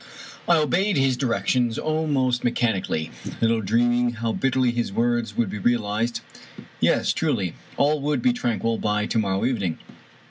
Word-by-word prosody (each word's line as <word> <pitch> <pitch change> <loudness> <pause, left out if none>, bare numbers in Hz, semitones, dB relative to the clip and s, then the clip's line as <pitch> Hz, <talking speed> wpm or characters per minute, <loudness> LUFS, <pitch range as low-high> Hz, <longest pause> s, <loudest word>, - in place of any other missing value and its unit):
I 170 - +5
obeyed 180 +5 +1
his 135 -1 +2
directions 120 -1 0
almost 145 -6 0
mechanically, 110 -9 -1 0.3
little 115 0 +2
dream 115 +4 +2
ing 120 0 +2
how 115 0 -2
bitterly 130 -2 +1
his 120 -3 -2
words 120 -1 0
would 115 -5 +1
be 105 - -5
realized. 115 +1 0 0.6
Yes, - - +2
truly - - 0
I - - -13 0.2
All 145 +1 +2
would 150 +8 -1
be 250 -1 +4
tranquil 115 - -1
by 105 0 0
to 115 - 0
morrow 95 -2 0
evening 100 -10 -1
120 Hz, 155 wpm, -24 LUFS, 110-135 Hz, 0.6 s, I